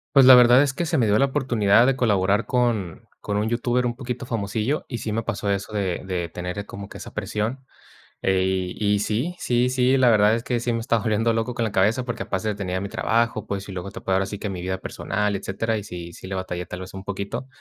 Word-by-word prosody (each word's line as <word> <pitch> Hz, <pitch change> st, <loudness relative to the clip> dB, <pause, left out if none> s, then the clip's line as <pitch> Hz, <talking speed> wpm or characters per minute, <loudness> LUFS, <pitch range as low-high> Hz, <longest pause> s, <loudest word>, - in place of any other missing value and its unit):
Pues, 135 Hz, -2 st, +8 dB
la 130 Hz, 0 st, +10 dB
verdad 125 Hz, +2 st, +7 dB
es 140 Hz, -2 st, +1 dB
que 170 Hz, +5 st, -2 dB
se 160 Hz, -1 st, 0 dB
me 125 Hz, -, +3 dB
dio 105 Hz, +1 st, +3 dB
la 140 Hz, -, +4 dB
oportunidad 120 Hz, -5 st, +3 dB
de 135 Hz, -, +3 dB
colaborar 100 Hz, -2 st, +2 dB
con 115 Hz, -9 st, 0 dB, 0.2 s
con 105 Hz, -, -3 dB
un 105 Hz, +2 st, 0 dB
youtuber 120 Hz, +1 st, 0 dB
un 120 Hz, 0 st, -1 dB
poquito 125 Hz, -2 st, -5 dB
famosillo, 115 Hz, +5 st, -2 dB
y 120 Hz, -, -4 dB
sí 110 Hz, -, -4 dB
me 115 Hz, +1 st, -1 dB
pasó 105 Hz, -3 st, -2 dB
eso 100 Hz, +2 st, -2 dB
de 95 Hz, -4 st, -1 dB
de 90 Hz, -2 st, -2 dB
tener 90 Hz, +4 st, -5 dB
como 100 Hz, 0 st, -8 dB
que -, -, -11 dB
esa -, -, -9 dB
presión. 115 Hz, +6 st, -3 dB, 0.6 s
Eh, 95 Hz, -1 st, +1 dB
y 105 Hz, -1 st, +1 dB
sí, 125 Hz, -, -1 dB
sí, 125 Hz, -5 st, +1 dB
sí, 130 Hz, +1 st, +3 dB
la 125 Hz, -2 st, +5 dB
verdad 105 Hz, +1 st, +5 dB
es 115 Hz, -, -3 dB
que 120 Hz, -2 st, -1 dB
sí 120 Hz, 0 st, -1 dB
me 115 Hz, -, -1 dB
estaba 115 Hz, -1 st, 0 dB
volviendo 110 Hz, +2 st, +1 dB
loco 115 Hz, +2 st, -2 dB
con 120 Hz, -, -1 dB
la 110 Hz, -, -2 dB
cabeza, 105 Hz, +7 st, +2 dB
porque 120 Hz, -1 st, -4 dB
aparte 105 Hz, +3 st, -2 dB
tenía 95 Hz, -2 st, -3 dB
mi 100 Hz, -, -3 dB
trabajo, 115 Hz, 0 st, 0 dB
pues, 100 Hz, -1 st, -4 dB
y 100 Hz, -, -7 dB
luego 95 Hz, +1 st, -5 dB
te -, -, -8 dB
puedo 95 Hz, -, 0 dB
ahora 95 Hz, 0 st, +1 dB
sí 105 Hz, 0 st, -5 dB
que 105 Hz, -, -4 dB
mi 90 Hz, -2 st, -5 dB
vida 95 Hz, +1 st, -2 dB
personal, 105 Hz, +1 st, -2 dB
etcétera, 105 Hz, +4 st, -2 dB
y 105 Hz, -, -8 dB
sí 85 Hz, -3 st, -8 dB
sí -, -, -10 dB
le 95 Hz, -, -4 dB
batallé 90 Hz, -1 st, -4 dB
tal 90 Hz, +1 st, -7 dB
vez 95 Hz, -, -9 dB
un 95 Hz, 0 st, -7 dB
poquito. 100 Hz, +6 st, -4 dB
105 Hz, 250 wpm, -23 LUFS, 95-120 Hz, 0.6 s, la